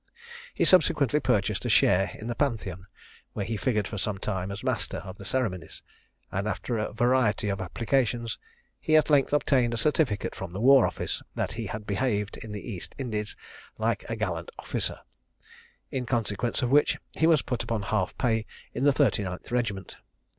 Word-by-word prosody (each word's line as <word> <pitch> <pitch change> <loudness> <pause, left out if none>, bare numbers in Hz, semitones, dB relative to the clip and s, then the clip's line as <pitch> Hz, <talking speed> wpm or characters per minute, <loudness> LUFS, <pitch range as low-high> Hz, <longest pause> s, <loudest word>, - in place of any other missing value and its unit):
He - - +2
subsequently 150 -5 +5
purchased 105 -7 +1
a 120 - -1
share 95 -3 +4
in 110 - -9
the 120 - -2
Pantheon, 100 - -2 0.5
where 100 - -3
he 115 - -2
figured 105 -4 0
for 105 - -5
some 100 0 -1
time 95 -1 -3
as 100 - -6
master - - -1
of 95 0 -8
the 100 - -9
ceremonies; 105 -7 -2 0.5
and 95 +2 -1
after 115 +2 -2
a 105 - -2
variety 115 -2 +2
of 100 -1 -2
applications 115 +4 0 0.4
he 155 - +2
at 155 - +3
length 140 -2 +4
obtained 130 -5 +2
a - - -3
certificate 130 - +1
from 95 -2 -7
the 95 - -4
War 135 +2 +7
office, - - -3
that - - -1
he - - -4
had 105 -1 -5
behaved 105 -1 -1
in 110 - -8
the 105 +2 -6
East 100 -7 -6
Indies 110 -5 -3 0.4
"like - - 0
a - - -1
gallant - - -3
officer;" - - -3 0.9
in 125 -2 -3
consequence 115 0 -1
of 125 - 0
which 145 +1 +4 0.2
he 160 - +2
was 160 -3 +4
put 125 - -2
upon 110 -3 -2
half 100 -2 -1
pay 115 -4 +1 0.3
in 135 - -1
the 145 - +6
39th 105 -11 0
regiment. 105 -7 -2
110 Hz, 180 wpm, -27 LUFS, 100-130 Hz, 0.9 s, War